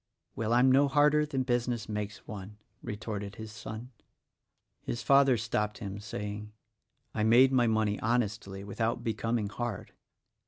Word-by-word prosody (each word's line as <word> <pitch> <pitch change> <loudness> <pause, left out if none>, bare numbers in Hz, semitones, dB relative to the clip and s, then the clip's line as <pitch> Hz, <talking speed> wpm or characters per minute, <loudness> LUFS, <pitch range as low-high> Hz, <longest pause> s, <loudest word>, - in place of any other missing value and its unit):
"Well, 110 0 -2
I'm 125 +2 +5
no 140 +2 +5
harder 150 +2 +4
than 135 -3 -1
business 120 -2 -1
makes 105 -1 -5
one," 105 0 -8 0.2
retorted 105 -2 -5
his 110 -1 -8
son. 110 +3 -8 0.9
His 120 - -4
father 135 -2 +5
stopped 105 -1 -1
him, 100 -2 -6
saying, 105 0 -6 0.6
"I 110 - -1
made 120 +4 +6
my 125 -3 +4
money 110 -2 +1
honestly, 105 -4 -1
without 115 +4 -2
becoming 115 -1 -1
hard." 115 -1 -4
110 Hz, 135 wpm, -30 LUFS, 105-125 Hz, 0.9 s, made